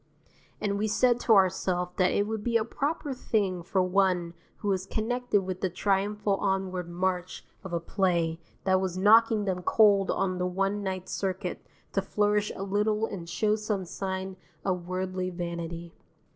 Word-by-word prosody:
And 200 -1 -1
we 215 - +1
said 240 +3 +3
to 225 -2 +4
ourself 180 -2 +2
that 185 -1 +4
it 205 - +1
would 220 0 -3
be 235 0 +2
a 220 - -1
proper 285 +3 -2
thing 200 -7 0
for 185 +2 +1
one 180 -2 +1 0.2
who 205 - -3
was 190 -1 0
connected 235 -1 0
with 185 0 -5
the 190 - +1
triumphal 200 +2 0
onward 190 -3 -1
march 180 +1 -2 0.2
of 190 - -7
a 170 - 0
play 170 -2 0 0.2
that 190 -1 +3
was 185 -1 -2
knocking 220 +2 +5
them 185 -2 -1
cold 200 0 +4
on 185 -1 0
the 180 - +1
one 195 +3 0
night 190 -2 -3
circuit 185 -2 -3 0.3
to 195 - +2
flourish 210 +1 +1
a 195 - -4
little 210 +2 +1
and 180 -6 -7
show 210 +4 +1
some 210 -3 -2
sign 190 +1 -4 0.3
of 180 -2 -1
worldly 185 0 -2
vanity. 170 -1 -5
190 Hz, 170 wpm, -28 LUFS, 180-210 Hz, 0.3 s, knocking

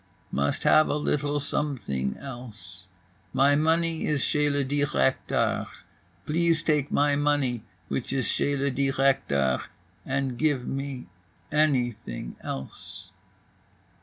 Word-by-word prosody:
"Must 70 +1 0
have 155 - +6
a - - +1
little 145 0 0
something 120 - -2
else. 110 -9 -9 0.5
My 140 +2 +5
money 160 +2 +2
is 150 -3 +2
chez 150 0 +2
le 140 -1 +1
directeur. 135 - +1 0.6
Please 165 +1 +2
take 150 -4 +1
my 145 0 +3
money 145 -5 +1 0.3
which 125 - -3
is 135 -2 0
chez 145 0 +1
le 140 +1 +1
directeur 130 - +2 0.4
and 135 -2 -2
give 145 -5 +1
me 135 -2 -4 0.5
anything 120 - 0
else." 65 0 -7
140 Hz, 110 wpm, -27 LUFS, 120-145 Hz, 0.6 s, have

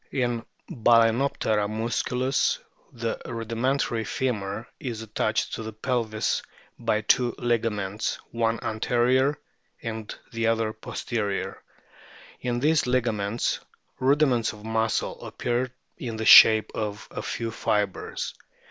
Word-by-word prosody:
In 120 -3 0 0.2
Balanoptera 115 -2 +3
muscuhis 120 +4 0 0.3
the 115 -1 -3
rudimen 115 +3 -1
tary 115 -4 -1
femur 110 -4 -2
is 115 -4 -4
attached 110 0 -1
to - - -3
the 110 0 -6
pelvis 110 -1 -1 0.4
by 110 -2 +1
two 120 +3 +2
ligaments, 110 -4 -1
one 115 -1 0
anterior, 125 +5 +2 0.5
and 110 -2 -5 0.2
the 115 -1 0
other 115 -1 +1
posterior. 110 -2 -3 0.8
In 120 -1 -1
these 150 +1 +3
liga 125 -2 +2
ments 105 +2 -1 0.4
rudiments 130 -4 +3
of 105 0 -12
muscle 110 0 -1
appear 120 +1 -1 0.3
in 115 -3 -4
the 110 - -3
shape 110 0 +9
of 105 -2 -4
a - - -4
few 115 -1 -3
fibres. 105 -3 -1
115 Hz, 115 wpm, -26 LUFS, 110-125 Hz, 0.8 s, shape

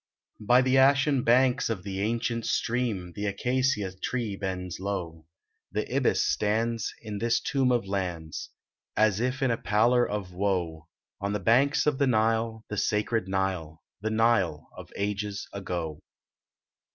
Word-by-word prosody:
By 125 +4 +4
the 130 +1 +4
ashen 140 0 +4
banks 125 +2 +3
of 105 -6 -3
the 95 -1 -4
ancient 115 +2 -1
stream 115 -7 -1
The 105 0 -2
acacia 125 0 0
tree 115 -4 -2
bends 95 -3 -4
low, 85 -5 -4 0.4
The - - -3
ibis - - +2
stands 115 +2 0
in 105 -2 -5
this 115 +1 +2
tomb 135 -2 +1
of 120 -4 +1
lands, 90 -5 -4 0.5
As 110 -2 +3
if 125 +3 -1
in 130 - +3
a 115 - 0
pallor 120 +4 +3
of 100 -3 -4
woe, 90 -5 -1 0.3
On 100 +1 -2
the 105 - -1
banks 135 - +3
of 150 -2 +1
the 140 - +3
Nile, 110 -1 +1
the 105 - -5
sacred 105 0 0
Nile, 95 -5 -2 0.2
The 110 - -1
Nile 110 -9 +1
of - - -11
ages 100 0 -3
ago. 85 -6 -4
105 Hz, 150 wpm, -27 LUFS, 95-120 Hz, 0.5 s, By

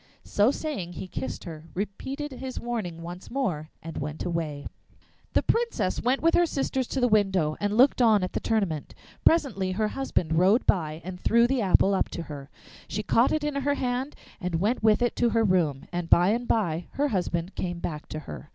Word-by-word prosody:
So 205 +3 +3
saying, 270 - -3
he 185 - -6
kissed 130 -7 -5
her, 160 -2 -8
repeated 265 +10 -4
his 260 0 -6
warning 195 -9 -4
once 175 +2 -8
more, 185 - -2
and 165 0 -6
went 150 +2 -4
away. 160 -5 -3 0.7
The - - +3
Princess 460 - 0
went 255 +4 +1
with 330 - +4
her 345 - +4
sisters 265 -3 -1
to 270 - -2
the 245 - +3
window 190 -8 +2
and 205 +1 0
looked 260 +1 +5
on 220 -5 +5
at 185 - -3
the - - 0
tournament. 195 -10 -1 0.3
Presently 250 - +2
her 215 +2 0
husband 195 - -1
rode 195 +7 +4
by 160 -4 0
and 180 -1 -6
threw 235 +4 +4
the 260 0 +1
apple 195 0 +4
up 190 - +1
to 170 - -5
her. 145 -3 -9 0.4
She 210 - -3
caught 230 +3 +3
it 310 -1 0
in 295 0 -1
her 280 +1 0
hand 255 +2 -2 0.2
and 180 -3 -2
went 210 +9 +1
with 220 +2 +4
it 240 - 0
to 240 - +3
her 225 0 +2
room, 170 -9 +1
and 175 -1 -3
by 175 +2 +6
and 240 +3 0
by 175 -6 0
her 290 +1 +1
husband 180 -3 -1
came 175 -1 -3
back 155 -3 -5
to 155 - -4
her. 75 - -9
200 Hz, 205 wpm, -27 LUFS, 170-245 Hz, 0.7 s, by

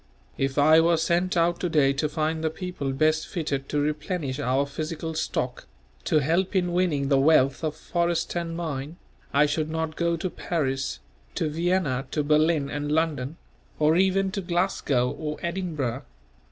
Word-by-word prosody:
If 135 +1 -1
I 155 +3 +6
were 170 0 +3
sent 175 +3 +1
out 170 +1 +2
to 180 - -1
day 140 -4 +3
to 150 +2 -1
find 160 +1 -1
the 160 - +2
people 160 -5 -4
best 155 +3 +1
fitted 140 -6 -3
to 150 - 0
replenish 150 -1 -2
our 135 0 +1
physical 155 +3 -4
stock, 155 - -3 0.4
to - - +3
help 180 +7 +1
in 180 -2 +1
winning 160 -7 +1
the 135 -2 +4
wealth 135 -1 +4
of 155 -1 -1
forest 170 +1 -1
and 170 -1 -3
mine, 155 -1 -4 0.3
I 145 +2 +4
should 155 +1 -1
not 160 0 -2
go 170 0 0
to 180 +3 -2
Paris, 135 - -2 0.3
to - - 0
Vienna, 160 -4 0
to 150 - -1
Berlin 155 0 +3
and 145 +1 -3
London; 155 -2 0 0.4
or 155 +1 +3
even 190 +1 +2
to 195 - -3
Glasgow 170 -8 0
or 150 +1 -4
Edinburgh. 160 -8 -2
155 Hz, 165 wpm, -26 LUFS, 145-170 Hz, 0.4 s, I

